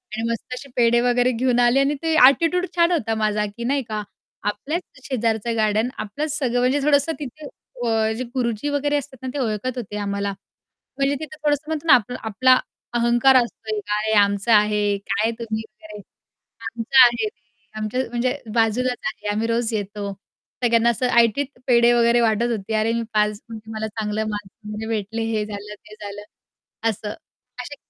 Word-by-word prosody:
आणि 225 +1 -2
मस्त 230 +2 -4
असे 265 +2 -8
पेढे 240 -1 +4
वगैरे 245 +1 +2
घेऊन 245 +1 +1
आले 240 +2 +4
आणि 280 +2 +2
ते 325 - +1
ॲटिट्यूड 330 +7 +5
छान 340 0 +4
होता 225 -10 0
माझा, 210 -1 0
की 205 +3 -7
नाही 270 +3 0
का 215 -1 -2 0.4
आपल्याच 280 - -2 0.2
शेजारचं 230 -3 -1
गार्डन, 215 +2 +2
आपलंच 290 +9 -3
सगळं 245 -3 0
म्हणजे 255 +4 +2
थोडंसं 285 +1 +3
तिथे 295 +2 -8 0.4
अ, 220 -1 +1
जे 255 - -2
गुरुजी 240 0 -2
वगैरे 290 0 +1
असतात 280 -2 -6
ना - - -3
ते 290 - -3
ओळखत 245 +1 -2
होते 210 -3 -5
आम्हाला. 200 0 -2 0.6
म्हणजे 275 +1 +1
तिथं 310 0 -8
थोडंसं 290 0 +2
म्हणतो 315 0 -3
ना, 280 - +8
आपला 245 +1 +3
आपला 255 +4 +4 0.4
अहंकार 240 +2 +4
असतो 235 -3 +1
एक, 210 - -3 0.2
आहे 215 +1 -1
आमचं 200 +3 0
आहे. 210 -1 +3
काय 215 +3 +1
तुम्ही 220 -2 -3
काय 215 -1 -13
वगैरे? 205 - -10 0.7
आमचं 235 +3 +5
आहे 235 -2 +1
ते, - - -39 0.4
आमच्या 215 +4 -1
म्हणजे 250 +3 -1 0.2
बाजूलाच 240 +2 +1
आहे, 245 -6 -4
आम्ही 220 +2 -1
रोज 230 0 0
येतो. 205 -1 -3 0.5
सगळ्यांना 235 -1 +4
असं 250 +2 0
ऐटीत 235 +5 +2 0.2
पेढे 240 -1 +5
वगैरे 235 0 +4
वाटत 230 +1 +2
होती, 215 +1 -6
"अरे 220 +1 +1
मी 235 - -1
पास 210 0 +3
झाले. 220 0 -11
मला 220 0 -3
चांगले 215 0 -2
मार्क्स 210 -2 -5 0.2
वगैरे 220 +1 -5
भेटले, 225 +1 -2
हे 215 -1 0
झालं, 210 0 -7
ते 210 +1 -16
झालं." 205 0 -7 0.7
असं. 210 -1 -4 0.5
असे 290 +4 -8
230 Hz, 180 wpm, -22 LUFS, 215-255 Hz, 0.7 s, ना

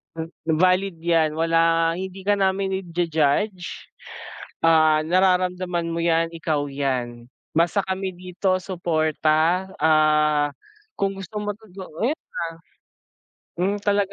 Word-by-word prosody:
M 165 +1 -6 0.2
valid 185 +2 +2
yan 160 -3 +2
wala 165 0 +3
hindi 190 +2 -6
ka 205 0 +1
namin 190 0 0
i-ju-judge, 170 +1 -1 0.7
ah, 155 -1 +4
nararamdaman 180 0 +1
mo 170 - -2
yan 165 0 +1
ikaw 155 -3 -1
yan 125 -4 -3 0.2
basta 170 +5 +2
kami 190 0 -2
dito 185 +1 -1
suporta, 165 0 0
ah, 150 -1 +3 0.5
kung 195 0 0
gusto 195 +2 -7
mo 205 - -3
todo 220 -1 -19
'yun 185 -3 -10
na. 240 - +2 1.5
Yun 200 +3 +1
talaga 200 -1 +1
170 Hz, 115 wpm, -23 LUFS, 155-190 Hz, 1.5 s, ah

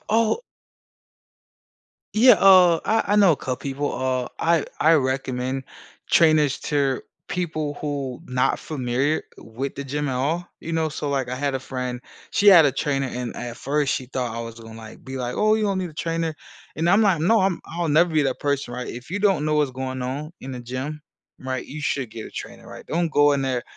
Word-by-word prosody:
Oh 225 - +2 1.8
Yeah, 250 +4 +8
uh, 185 -3 +6
I 225 +1 +2
I - - +4
know 200 -4 +6
a 150 - -1
couple 130 -1 -3
people. 140 +3 -3
Uh, 130 -1 -1
I 165 -2 +2
I 160 - +5
recommend 130 -1 -1 0.4
trainers 155 -4 +4
to 140 -3 0 0.3
people 155 -4 -2
who 140 -4 -4
not 125 0 0
familiar 140 0 -1 0.2
with 125 +5 -6
the 140 - -5
gym 145 +2 -3
at 130 - -1
all, 155 +7 -1
you 165 - -6
know? 160 -1 0
So, 145 0 -4
like, 135 -3 -1
I 125 - -2
had 140 +1 -1
a - - -3
friend. 125 -1 -5 0.3
She 205 - +1
had 175 -6 +9
a - - +3
trainer, 135 -1 -1
and 125 -1 -5
at 120 -1 -6
first, 145 0 0
she 130 - -4
thought 125 -3 -3
I - - -3
was 115 0 -8
gonna, 115 0 -11
like, 110 -1 -12
be, 130 0 -6
like, 125 -1 -3
“Oh, 215 0 +3
you 220 -1 0
don't 200 -2 0
need 180 -2 -3
a - - -15
trainer.” 165 0 -2 0.4
And 165 +3 0
I'm, 200 +4 +5
like, 190 -7 +3
"No," 220 +8 +4
I'm, 190 -2 +1
I'll 170 0 -3
never 165 +4 +4
be 155 -2 +2
that 135 -2 -1
person, 140 -4 -2
right? 125 0 -5
If 125 +6 -8
you 200 - -2
don't 195 -7 +2
know 155 0 +1
what's 150 -3 +2
going 130 0 -4
on 140 +5 -4
in 135 - -6
the 125 - -6
gym, 130 +5 -5 0.4
right, 130 -1 -4
you 150 - -8
should 135 -5 -2
get 115 -1 -7
a - - -11
trainer, - - -9
right? - - -10
Don't 170 0 0
go 145 0 +4
in 140 - +1
there, 130 -2 -1
145 Hz, 215 wpm, -23 LUFS, 130-165 Hz, 1.8 s, had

